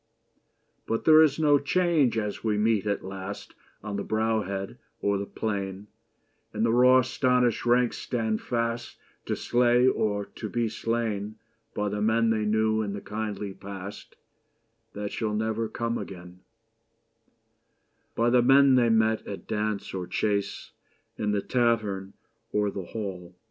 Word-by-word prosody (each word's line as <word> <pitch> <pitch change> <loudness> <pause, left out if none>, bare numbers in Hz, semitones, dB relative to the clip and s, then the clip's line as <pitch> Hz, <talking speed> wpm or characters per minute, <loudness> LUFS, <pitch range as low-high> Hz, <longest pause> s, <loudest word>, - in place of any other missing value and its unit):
But 115 - -2
there 155 0 +8
is 155 -3 +4
no 145 -2 +4
change 155 -5 +2
as 105 -2 -3
we 110 -2 +1
meet 105 -1 +1
at 100 -2 -1
last 95 +1 -7 0.3
On 105 -1 -4
the 100 - -2
brow 110 0 0
head 95 -1 -5 0.2
or 100 -1 0
the 100 - -4
plain, 100 -1 -4 0.6
And 110 - 0
the 115 - +2
raw 125 +1 +6
astonished 125 -2 +1
ranks 120 0 +2
stand 110 -3 -2
fast 115 0 -2 0.3
To - - 0
slay 120 0 +3
or 105 -4 0
to 110 - -8
be 120 0 0
slain 110 -2 -2 0.4
By 105 0 -1
the 105 +1 -3
men 115 +1 +3
they 110 -1 0
knew 110 +1 +2
in 100 -2 -3
the 100 - -5
kindly 105 -2 -4
past 100 0 -9 0.8
That 105 0 -4
shall 110 -2 -2
never 110 +1 -1
come 115 0 -2
again 90 -1 -9 0.9
— - - -45
By 115 +1 +2
the 125 0 +5
men 135 +2 +6
they 120 -2 +4
met 110 0 +2
at 100 - -7
dance 105 -1 -2
or 90 -2 -4
chase, 100 +2 -2 0.5
In 105 - 0
the 105 -1 0
tavern 110 -6 0 0.4
or 105 -1 +1
the 95 -2 -6
hall. 90 -5 -6
110 Hz, 155 wpm, -27 LUFS, 100-120 Hz, 0.9 s, there